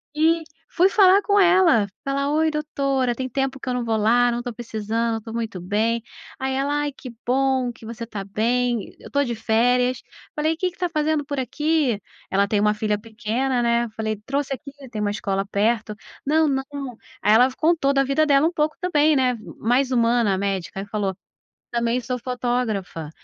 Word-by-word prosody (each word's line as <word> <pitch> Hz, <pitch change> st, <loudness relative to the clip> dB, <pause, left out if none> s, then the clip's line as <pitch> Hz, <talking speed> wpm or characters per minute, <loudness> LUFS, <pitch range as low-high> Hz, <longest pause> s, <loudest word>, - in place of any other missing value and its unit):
e 325 Hz, +1 st, +3 dB, 0.3 s
fui 365 Hz, +3 st, +3 dB
falar 390 Hz, 0 st, +6 dB
com 405 Hz, 0 st, +3 dB
ela, 350 Hz, -, +5 dB, 0.2 s
falar: 280 Hz, +1 st, 0 dB
"Oi, 315 Hz, +1 st, +2 dB
doutora, 275 Hz, -4 st, -1 dB
tem 260 Hz, +1 st, -4 dB
tempo 270 Hz, +1 st, -2 dB
que 255 Hz, -, -5 dB
eu -, -, 0 dB
não 245 Hz, -1 st, -2 dB
vou 225 Hz, -1 st, +1 dB
lá, 240 Hz, +3 st, +3 dB
não 240 Hz, -, -2 dB
estou 240 Hz, -1 st, -5 dB
precisando, 225 Hz, 0 st, -2 dB
estou 225 Hz, +1 st, -9 dB
muito 225 Hz, -6 st, -4 dB
bem". 220 Hz, +5 st, 0 dB, 0.4 s
Aí 265 Hz, 0 st, -1 dB
ela: 285 Hz, +2 st, 0 dB
"Ai 290 Hz, -, -2 dB
que 255 Hz, -, -9 dB, 0.2 s
bom 260 Hz, -1 st, +2 dB
que 225 Hz, -, -15 dB
você 230 Hz, +1 st, -6 dB
tá 205 Hz, -4 st, -5 dB
bem, 235 Hz, +2 st, 0 dB
eu -, -, -12 dB
estou 285 Hz, 0 st, +1 dB
de 235 Hz, -1 st, -3 dB
férias". 245 Hz, +3 st, +2 dB, 0.3 s
Falei: 310 Hz, +2 st, +1 dB
"Que 365 Hz, 0 st, -1 dB
que -, -, -24 dB
tá 355 Hz, -1 st, -1 dB
fazendo 305 Hz, -2 st, 0 dB
por 285 Hz, -1 st, -3 dB
aqui?" 295 Hz, -3 st, 0 dB, 0.3 s
Ela 200 Hz, +1 st, +3 dB
tem 205 Hz, 0 st, +1 dB
uma 210 Hz, 0 st, +3 dB
filha 210 Hz, -1 st, -1 dB
pequena 235 Hz, +3 st, -1 dB
né. 235 Hz, 0 st, +2 dB
Eu 220 Hz, -, -9 dB
falei: 220 Hz, 0 st, -2 dB
"Trouxe 275 Hz, 0 st, -1 dB
aqui", 280 Hz, +1 st, -8 dB, 0.2 s
tem 215 Hz, -2 st, -4 dB
uma 205 Hz, -1 st, 0 dB
escola 195 Hz, -1 st, -2 dB
perto. 215 Hz, +1 st, 0 dB, 0.3 s
"Não, 310 Hz, +2 st, +3 dB
não". 270 Hz, -2 st, -3 dB, 0.3 s
Aí 210 Hz, -, +4 dB
ela 245 Hz, +3 st, +7 dB
f 255 Hz, -, -12 dB
contou 310 Hz, -4 st, +2 dB
da 275 Hz, 0 st, +3 dB
vida 275 Hz, +3 st, +2 dB
dela 285 Hz, +2 st, +4 dB
um 340 Hz, -, -2 dB
pouco 305 Hz, 0 st, 0 dB
também, 310 Hz, -4 st, +3 dB
né, 250 Hz, -2 st, +2 dB, 0.2 s
mais 250 Hz, +4 st, +2 dB
humana 235 Hz, -3 st, +3 dB
a -, -, -3 dB
médica 195 Hz, -1 st, -2 dB
e -, -, -6 dB
falou: 200 Hz, -3 st, -2 dB, 0.6 s
"Também 235 Hz, +1 st, 0 dB
sou 250 Hz, +1 st, -3 dB
fotógrafa, 235 Hz, -, -2 dB
245 Hz, 200 wpm, -23 LUFS, 220-285 Hz, 0.6 s, ela